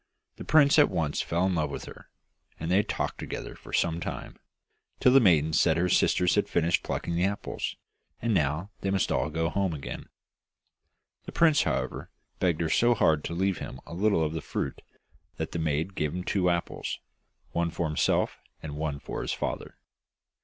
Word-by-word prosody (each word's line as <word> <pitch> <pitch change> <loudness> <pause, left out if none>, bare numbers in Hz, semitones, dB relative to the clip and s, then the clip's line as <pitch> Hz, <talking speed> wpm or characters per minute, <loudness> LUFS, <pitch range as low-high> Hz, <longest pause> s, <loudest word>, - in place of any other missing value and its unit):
The - - -7
prince 150 0 +5
at 150 - +6
once 80 -5 -1
fell 85 +2 0
in 95 - +1
love 80 -3 0
with - - -6
her, - - -12 0.5
and 80 +2 -3
they 95 +3 +5
talked 105 - -3
together - - -5
for - - -13
some 85 0 +1
time, - - -6 0.6
till 125 - +5
the 135 - +8
maiden 80 - +4
said 80 0 +4
her 90 +2 +1
sisters 90 0 +3
had - - +1
finished 85 0 +2
plucking 85 - -3
the 85 +1 +1
apples, 100 +1 -3 0.4
and 115 0 0
now 80 +4 0
they 100 - -1
must 95 -1 +1
all 75 - +1
go 80 +1 0
home 95 0 0
again. 70 - -7 1.2
The - - -7
prince, 160 -3 +4
however, - - -2 0.3
begged 85 -3 +1
her 80 - 0
so 120 +7 +4
hard 80 -7 +3
to 85 - -3
leave 95 -1 0
him 65 - -7
a - - -9
little 100 -1 +2
of 80 0 -1
the 80 - -3
fruit 70 - -4 0.6
that - - -3
the 85 - -3
maiden 80 +4 -1
gave 75 -2 -2
him 90 - -3
two 90 -1 +1
apples, 85 -1 -2 0.5
one 85 0 0
for 85 +1 -2
himself 75 - +1 0.2
and 75 -2 -5
one 75 -2 -2
for - - -5
his - - -2
father. - - -4
85 Hz, 190 wpm, -28 LUFS, 80-95 Hz, 1.2 s, the